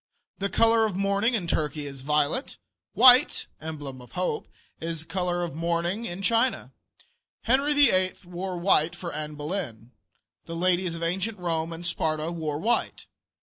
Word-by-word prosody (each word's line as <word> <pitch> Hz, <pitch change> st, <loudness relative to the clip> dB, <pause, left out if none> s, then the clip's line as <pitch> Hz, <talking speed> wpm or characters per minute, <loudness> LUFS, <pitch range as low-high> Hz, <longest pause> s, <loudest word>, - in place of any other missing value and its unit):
The 200 Hz, 0 st, -1 dB
color 225 Hz, 0 st, +4 dB
of 200 Hz, -, -5 dB
mourning 200 Hz, +5 st, +1 dB
in 195 Hz, -6 st, -2 dB
Turkey 150 Hz, -2 st, -1 dB
is 135 Hz, -2 st, -8 dB
violet. 150 Hz, -, 0 dB, 0.4 s
White 255 Hz, +2 st, +6 dB, 0.2 s
(emblem 145 Hz, -5 st, -7 dB
of 125 Hz, -, -16 dB
hope) 180 Hz, 0 st, -2 dB, 0.3 s
is 165 Hz, -1 st, -4 dB
the -, -, -11 dB
color 175 Hz, 0 st, -1 dB
of 170 Hz, -, -4 dB
mourning 170 Hz, +6 st, -1 dB
in 185 Hz, -1 st, -5 dB
China. 230 Hz, +5 st, +1 dB, 0.7 s
Henry 275 Hz, +5 st, +2 dB
VIII. 185 Hz, -10 st, +4 dB
wore 180 Hz, +1 st, -5 dB
white 170 Hz, -2 st, +2 dB
for 175 Hz, -1 st, -6 dB
Anne 150 Hz, 0 st, -5 dB
Boleyn. 145 Hz, -, -5 dB, 0.5 s
The 165 Hz, -, -6 dB
ladies 180 Hz, 0 st, +1 dB
of 165 Hz, -, -5 dB
ancient 190 Hz, +6 st, -1 dB
Rome 165 Hz, -2 st, -2 dB
and 165 Hz, +1 st, -7 dB
Sparta 155 Hz, -1 st, -1 dB
wore 155 Hz, -3 st, -3 dB
white. 225 Hz, +9 st, -1 dB
175 Hz, 155 wpm, -26 LUFS, 155-195 Hz, 0.7 s, White